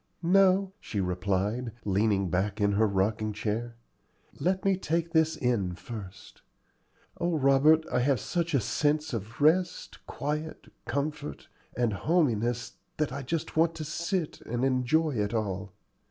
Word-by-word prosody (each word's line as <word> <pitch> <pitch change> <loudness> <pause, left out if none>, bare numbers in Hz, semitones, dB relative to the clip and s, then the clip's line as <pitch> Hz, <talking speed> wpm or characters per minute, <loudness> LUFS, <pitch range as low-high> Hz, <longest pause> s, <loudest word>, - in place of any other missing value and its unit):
"No," 190 +2 +4
she 105 - -4
replied, 100 +6 -1
leaning 100 -2 +1
back 100 +3 0
in 100 -1 +3
her 110 +2 +3
rocking 105 +2 0
chair: 115 +3 -3 0.6
"let 190 +2 0
me 195 -1 +4
take 170 -2 -1
this 160 -1 +3
in 105 -8 0
first. 100 -4 -10 0.8
O 170 -1 +1
Robert, 145 +3 +5
I - - +2
have 130 0 +2
such 170 +2 -1
a - - +4
sense 150 +6 0
of 115 +1 -5
rest, 170 +5 +1
quiet, 150 +2 -4
comfort, 140 - -4 0.3
and 120 -3 +1
hominess 120 - 0 0.2
that 150 -4 -1
I 140 - -4
just 155 +4 -3
want 165 +1 +3
to 155 - -5
sit 170 +2 -2
still - - -13
and 120 +2 0
enjoy 135 +5 +2
it 105 +1 -1
all. 100 -2 -2
125 Hz, 145 wpm, -28 LUFS, 105-160 Hz, 0.8 s, Robert